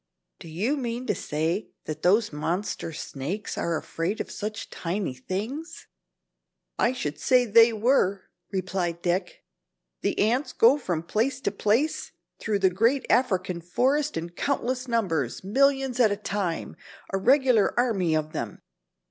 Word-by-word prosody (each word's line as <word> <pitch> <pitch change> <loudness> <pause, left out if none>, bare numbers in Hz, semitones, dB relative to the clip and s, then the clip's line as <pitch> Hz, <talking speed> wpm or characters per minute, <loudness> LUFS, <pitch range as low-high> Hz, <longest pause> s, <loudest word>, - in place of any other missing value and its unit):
"Do - - -11
you 205 - -1
mean 240 -1 -3
to - - +1
say 160 +7 -2 0.2
that 155 - -5
those 205 +1 +3
monster 170 +4 -2
snakes 160 +6 -5
are 170 -1 -1
afraid 170 +8 -3
of - - -4
such 215 +1 -5
tiny 175 -3 -3
things?" 220 - -5 0.9
"I 240 - +3
should 155 - -4
say 250 -1 +4
they 230 +1 +6
were," 215 -4 +2 0.3
replied 185 -3 -2
Dick, 180 +1 -2 0.6
"the - - -1
ants 240 +7 +1
go 255 +6 +5
from 175 - -2
place 235 +9 0
to 200 - 0
place 220 +9 0 0.3
through 215 -2 0
the 190 -1 +3
great 230 +8 +2
African 185 -8 +1
forest 270 - +1
in 170 +1 -4
countless 255 +4 -2
numbers, 180 - -1
millions 270 +4 +2
at 225 -4 +5
a 200 - -1
time, 195 -5 -3 0.4
a 195 - +1
regular 250 -1 +4
army 195 -10 +2
of 155 0 -2
them. - - -5
205 Hz, 145 wpm, -26 LUFS, 175-250 Hz, 0.9 s, they